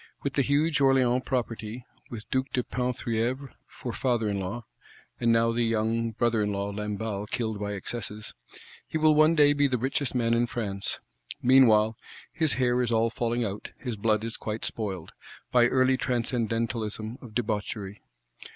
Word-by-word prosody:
With 140 - -1
the 140 - +2
huge 145 +3 +2
Orléans 130 -2 +3
Property, 120 -2 -3 0.2
with 110 -3 -8
Duke 130 +1 0
de 125 - +1
Penthievre 125 +1 -2 0.2
for - - -7
Father 120 -4 0
in 100 -1 -1
law 105 +5 -4 0.5
(and 115 -1 +3
now 115 0 +3
the 120 +1 0
young 115 0 +1
Brother 115 0 +1
in 105 0 0
law 100 0 -2
Lamballe 105 0 -3
killed 110 -4 -2
by 105 0 -3
excesses),—he 105 - -7
will 155 0 +5
one 155 +2 +5
day 145 -2 +6
be 145 0 +3
the 130 -2 0
richest 130 +2 -1
man 115 -2 +2
in 120 +1 +2
France. 100 -5 -3 0.4
Meanwhile, 115 -4 +5 0.4
"his 160 -3 +2
hair 125 -1 +2
is 120 -1 0
all 115 0 +2
falling 120 +1 -1
out, 100 0 -5
his 125 -4 -4
blood 110 0 +1
is 115 0 -3
quite 110 +1 -4
spoiled,"—by 110 +4 -1
early 130 +1 +3
transcendentalism 115 -2 -2
of 115 -4 -12
debauchery. 105 -3 -3
115 Hz, 160 wpm, -27 LUFS, 110-130 Hz, 0.5 s, day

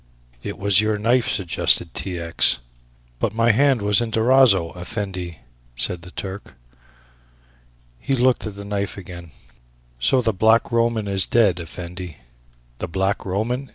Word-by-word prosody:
"It 100 - -6
was 100 0 +3
your 110 0 0
knife," 115 +4 +2
suggested 85 -2 +1
T. 90 -2 -4
X. 85 -5 +2 0.6
"But - - -1
my 115 0 +4
hand 130 -1 +2
was 105 +2 +3
in 120 - -2
Durazzo, 110 -6 +4
Effendi," 90 -3 -5 0.4
said 85 +8 -2
the 90 - -12
Turk. 95 +2 -8 1.4
He 135 - -2
looked 125 -2 +1
at 105 - -7
the 100 0 -9
knife 100 0 -3
again. 85 -2 -10 0.7
"So 95 - +3
the 115 -1 +1
Black 110 +4 +3
Roman 115 -2 +1
is 95 -1 +1
dead, 105 -7 +3
Effendi." 85 0 -8 0.6
"The 90 - -3
Black 95 +4 -1
Roman?" 120 +8 -2
100 Hz, 145 wpm, -21 LUFS, 90-115 Hz, 1.4 s, my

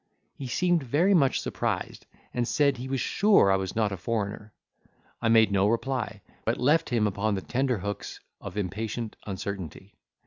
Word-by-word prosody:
He 135 - -7
seemed 175 +6 +2
very 150 +10 +2
much 140 -7 +3
surprised, - - -3 0.3
and 120 -1 0
said, 140 -1 +2
he 125 +2 -6
was 135 -1 -1
sure 200 - +4
I - - +4
was 95 -1 -3
not 110 -2 +1
a 95 - -4
foreigner. 105 +1 -3 0.7
I 115 - +1
made 110 -2 +5
no 100 0 +3
reply, 115 -1 -1 0.2
but 115 - 0
left 150 +6 +3
him 115 -4 +2
upon 105 +1 0
the 95 - -3
tenter 125 +1 0
hooks 100 +1 -5 0.2
of - - -8
impatient 110 +3 -3
uncertainty. 95 -1 -6
115 Hz, 170 wpm, -27 LUFS, 100-130 Hz, 0.7 s, made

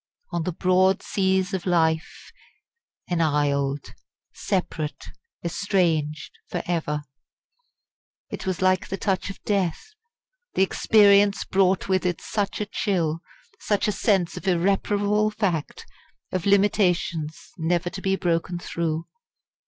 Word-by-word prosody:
"On 170 - -1
the 180 - -2
broad 185 +2 +2
seas 190 0 0
of 190 -1 -3
life 160 -2 0 0.8
enisled" 145 -4 0 0.4
separate, 170 -6 -3 0.4
estranged, 165 -5 0 0.2
for - - -3
ever? 155 -4 -1 1.3
It - - -6
was 185 0 -1
like 185 0 +2
the 195 - -4
touch 195 -1 -1
of 195 - -9
death 200 - -1 0.6
the 190 - +4
experience 200 0 +4
brought 190 -1 +2
with 190 -1 +1
it 180 -2 -1
such 200 -2 -2
a 210 - -1
chill 170 -6 -1 0.4
such 205 -1 0
a - - +2
sense 195 -4 +1
of - - -7
irreparable 200 +3 +2
fact, 195 -8 -2 0.5
of 185 0 -2
limitations 180 -6 +1
never 175 +2 0
to 190 - -7
be 190 0 +1
broken 175 -1 -1
through. 165 -2 -3
185 Hz, 120 wpm, -24 LUFS, 165-195 Hz, 1.3 s, the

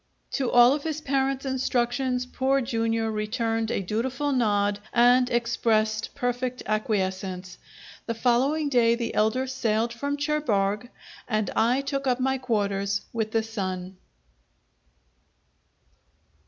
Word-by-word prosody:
To 260 -3 -1
all 245 +1 +7
of 290 - -2
his 315 0 -3
parent's 270 -1 -1
instructions 250 -1 0
Poor 265 +2 +1
Jr. 230 -2 -1
returned 225 +1 -1
a - - -1
dutiful 255 +9 -1
nod 205 -5 +1
and 245 +1 +5
expressed 225 -2 0
perfect 250 -1 -2
acquiescence. 190 -4 -2 0.5
The 230 - -2
following 260 +6 +2
day 235 -4 +3
the 235 -1 -3
elder 220 +5 +1
sailed 235 -3 -1
from 285 +4 -3
Cherbourg, 245 -8 0 0.4
and 215 -1 -1
I 245 +4 +2
took 275 -1 -3
up 250 0 +2
my 265 +1 0
quarters 200 -4 -1
with 220 -2 -1
the 225 0 0
son. 190 -4 -5
235 Hz, 120 wpm, -26 LUFS, 215-260 Hz, 0.5 s, all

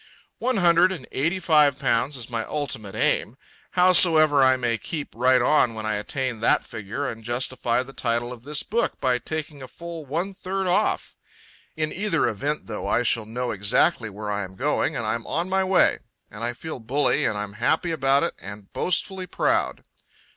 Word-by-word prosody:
One 255 0 0
hundred 175 0 +4
and 160 -9 -6
eighty 165 +8 0
five 150 -6 +4
pounds 130 0 0
is 120 -2 -5
my 115 -2 -3
ultimate 110 -9 -4
aim. 115 +2 0 0.4
Howsoever, 165 -5 +6
I 130 0 +5
may 120 -3 -1
keep 155 -4 -5
right 125 +2 +4
on 125 -5 +3
when 110 0 -5
I 110 - 0
attain 125 +2 -3
that 115 - +2
figure 110 +6 -5
and 115 -2 -6
justify 120 +1 0
the 135 +1 -13
title 120 0 -1
of 120 - -12
this 145 +3 0
book 235 +3 -1
by 125 -2 +1
taking 150 +2 -5
a 130 - -8
full 170 +1 -8
one 165 +8 -3
third 190 0 -3
off. 185 +4 0 0.6
In 155 -1 -1
either 195 -4 +1
event, 145 +8 -2
though, 105 -2 -5
I 120 - +2
shall 115 -2 0
know 125 +2 -3
exactly 110 - +2
where 105 +1 -6
I 105 0 -1
am 95 0 -9
going 150 +6 0
and 115 - -2
I'm 115 +2 -2
on 170 +3 -1
my 190 0 +2
way. 185 -1 +3 0.3
And 105 +2 -7
I 120 +1 0
feel 155 +3 -7
bully 130 +6 +1
and 105 - 0
I'm 105 -1 -4
happy 160 +10 0
about 135 -2 +2
it 170 - -1
and 100 0 -10
boastfully 185 +1 -1
proud. - - 0
130 Hz, 190 wpm, -24 LUFS, 115-165 Hz, 0.6 s, Howsoever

